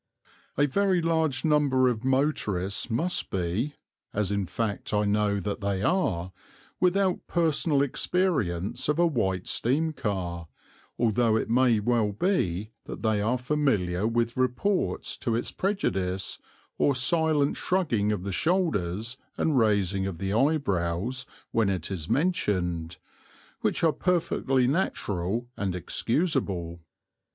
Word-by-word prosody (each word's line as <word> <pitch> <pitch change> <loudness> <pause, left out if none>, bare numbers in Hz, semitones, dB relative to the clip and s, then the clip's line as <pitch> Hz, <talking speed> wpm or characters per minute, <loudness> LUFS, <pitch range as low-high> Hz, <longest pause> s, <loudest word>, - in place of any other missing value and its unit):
A 145 - +4
very 190 +5 +2
large 160 -5 +1
number 145 -4 +3
of 120 -2 -1
motorists 125 -9 0
must 165 +11 -1
be 95 - -2 0.4
as 100 -2 0
in 100 -2 -1
fact 105 +2 -2
I 105 0 +2
know 105 0 +1
that 100 +2 -4
they 100 -1 -1
are 95 - 0 0.5
without 185 0 +1
personal 160 -3 +2
experience 135 - -1
of 150 - +2
a 175 - +4
White 95 - 0
steam 155 +7 +1
car, 95 - -3 0.5
although 115 -1 +2
it 110 - -1
may 120 -2 +4
well 110 -1 +1
be 105 - 0
that - - -8
they 110 -2 +2
are 115 +5 +1
familiar 115 -9 0
with 115 0 0
reports 130 +11 0
to 115 -4 -1
its 115 - -1
prejudice, 95 - -1 0.4
or 140 - +3
silent 150 +2 +2
shrugging 120 - +1
of 100 -4 -2
the 100 - -3
shoulders 115 - 0 0.2
and 150 -5 +2
raising 100 -3 +2
of 95 -4 -5
the 95 +1 -2
eyebrows 115 - 0 0.2
when 110 -3 +2
it 95 0 -2
is 85 -4 -5
mentioned, 90 - 0 0.6
which - - 0
are 160 -2 +4
perfectly 135 -7 +1
natural 115 - -1
and 95 -3 -2
excusable. 95 - -1
115 Hz, 130 wpm, -27 LUFS, 95-150 Hz, 0.6 s, A